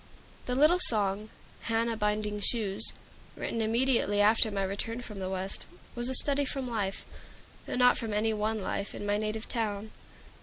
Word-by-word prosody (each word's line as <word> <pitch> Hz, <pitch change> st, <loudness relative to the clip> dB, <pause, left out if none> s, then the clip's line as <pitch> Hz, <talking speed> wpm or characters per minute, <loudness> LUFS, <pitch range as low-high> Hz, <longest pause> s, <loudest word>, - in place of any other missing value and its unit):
The 250 Hz, -, 0 dB
little 305 Hz, +6 st, +5 dB
song 210 Hz, -, 0 dB, 0.4 s
"Hannah 230 Hz, 0 st, +1 dB
Binding 210 Hz, -1 st, -1 dB
Shoes" 210 Hz, -1 st, 0 dB, 0.4 s
written 230 Hz, -, -2 dB
immediately 230 Hz, -2 st, +2 dB
after 220 Hz, +2 st, +5 dB
my 200 Hz, -2 st, -1 dB
return 205 Hz, +4 st, -2 dB
from 210 Hz, -4 st, -7 dB
the 185 Hz, -1 st, -3 dB
West, 190 Hz, 0 st, -4 dB, 0.3 s
was 240 Hz, +1 st, -3 dB
a 260 Hz, -, +1 dB
study 285 Hz, +2 st, +3 dB
from 270 Hz, -1 st, -3 dB
life 205 Hz, -5 st, -2 dB, 0.6 s
though -, -, -3 dB
not 250 Hz, 0 st, +5 dB
from 225 Hz, -2 st, -3 dB
any 215 Hz, +2 st, +1 dB
one 215 Hz, +1 st, -1 dB
life 200 Hz, +2 st, -3 dB
in -, -, -5 dB
my 205 Hz, 0 st, +1 dB
native 215 Hz, +1 st, -3 dB
town. 215 Hz, -2 st, -2 dB
220 Hz, 165 wpm, -30 LUFS, 205-235 Hz, 0.6 s, little